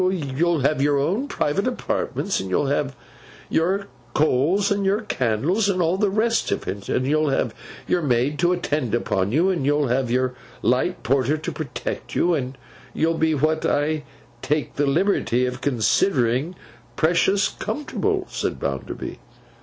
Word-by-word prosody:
'You'll 170 -3 +1
have 140 +1 +2
your 145 0 +3
own 190 - 0
private 195 - 0
apartments, 240 -5 -1
and 95 - -4
you'll 95 +10 +1
have 140 0 -1 0.6
your 190 +5 +1 0.3
coals 155 +8 +2
and 200 0 +1
your 195 +3 +2
candles, 170 - 0
and 185 -2 0
all 170 +1 +2
the 205 0 +2
rest 225 +3 +1
of - - -2
it, 100 +1 -5
and 130 - +1
you'll 155 +2 +2
have 135 - 0 0.3
your 180 - +2
maid 135 +1 +1
to 175 0 +3
attend 145 - 0
upon 95 -4 0
you, 170 +9 +3
and 170 -7 -1
you'll 145 -1 +2
have 125 0 +1
your 130 +1 +1 0.3
light 130 +9 +1
porter 135 +3 +2
to 155 +3 -4
protect 150 -5 -5
you, 175 - +3
and 135 -3 -2 0.4
you'll 165 +1 +2
be 160 -1 +1
what 155 +2 +1
I 150 +1 +1 0.4
take 150 0 -1
the 145 0 +1
liberty 140 - +2
of 125 +1 -4
considering 125 - +1 0.4
precious 180 +5 +3
comfortable,' 380 +6 -2
said - - -3
Bounderby. - - -4
150 Hz, 160 wpm, -23 LUFS, 130-185 Hz, 0.6 s, your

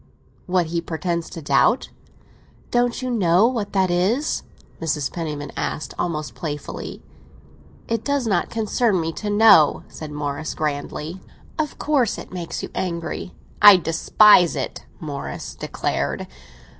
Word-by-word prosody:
"What 180 -1 +2
he 170 +1 -2
pretends 170 0 -3
to 165 - -8
doubt?" 145 - +3 0.8
"Don't 245 +1 +1
you 255 - -2
know 185 -3 +4
what 230 -5 -1
that 190 -2 +2
is?" 210 - +1 0.4
Mrs. 150 -4 -1
Penniman 150 -4 -4
asked 155 - -3
almost 155 -7 -2
playfully. 150 -1 -6 0.8
"It 230 -1 -1
does 280 -3 0
not 195 -6 +1
concern 220 -2 +1
me 165 0 -2
to 210 - -4
know," 205 -7 +6
said 155 - -8
Morris 145 +1 -4
grandly. 150 +3 -4 0.4
"Of 300 -2 -2
course 275 -7 +1
it - - -10
makes 170 -2 -5
you - - -6
angry." 170 0 -4 0.3
"I 205 -2 +10
despise 175 +2 +5
it," 135 - -5
Morris 145 -3 -6
declared. - - -2
175 Hz, 130 wpm, -22 LUFS, 155-215 Hz, 0.8 s, I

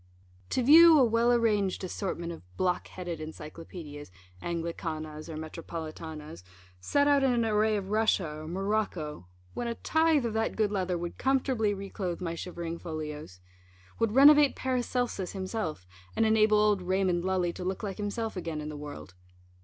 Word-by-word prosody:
To 255 - 0
view 320 +4 +9
a 275 - +6
well 230 +1 +3
arranged 210 -6 +1
assortment 175 -2 -3
of 165 - -8 0.2
blockheaded 180 -2 -2
Encyclopædias 155 - -9 0.3
(Anglicanas 165 -2 -4
or 160 - -6
Metropolitanas) 160 - -7 0.4
set 285 - +2
out 285 -1 +4
in 265 - +4
an 235 -2 +1
array 215 0 +2
of 195 0 -5
Russia, 215 -5 +2
or 155 - -8
Morocco, 180 - -2 0.3
when 240 - -3
a 235 - -2
tithe 320 -3 +2
of 230 - -2
that 225 0 -1
good 215 -2 +1
leather 185 -3 -1
would 175 0 -6
comfortably 255 -6 +1
re 195 0 -8
clothe 180 -4 -3
my 170 -2 -3
shivering 170 -1 -5
folios; 150 - -7 0.6
would 225 -2 +1
renovate 290 +2 +7
Paracelsus 245 -6 -2
himself, 185 - -4 0.3
and 225 - +3
enable 215 -1 +4
old 210 -2 +3
Raymund 180 -1 +1
Lully 185 -2 0
to 180 - -7
look 185 +2 -3
like 195 -2 -4
himself 215 +2 -3
again 165 -4 -4
in 150 0 -5
the 150 - -6
world. 145 -11 -9
190 Hz, 160 wpm, -29 LUFS, 165-225 Hz, 0.6 s, view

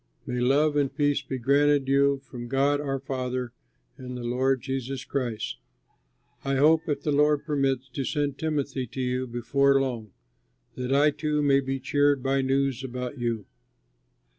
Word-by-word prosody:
May 125 0 -3
love 145 +4 +3
and 140 -2 +1
peace 145 -1 +1
be 135 -1 -5
granted 140 +2 +3
you 140 0 +3
from 120 -3 -8
God 140 +3 +2
our 135 -2 -2
Father 130 -2 -3 0.4
and 125 -1 -7
the 120 - -6
Lord 130 +2 +1
Jesus 135 0 -4
Christ. 115 - -3 0.8
I 135 0 0
hope, 160 +4 +4
if 145 - -1
the 150 - 0
Lord 150 0 +3
permits, 135 -4 0
to 135 +2 -4
send 145 0 -2
Timothy 140 -5 -2
to 130 - -8
you 125 0 -1
before 135 +4 +2
long, 120 -5 -3 0.6
that 125 0 -4
I 145 +2 +4
too 150 0 -1
may 140 -1 +4
be 135 0 -3
cheered 145 0 +2
by 135 0 +1
news 135 -1 0
about 125 +1 -5
you. 115 -4 -2
135 Hz, 165 wpm, -26 LUFS, 125-145 Hz, 0.8 s, hope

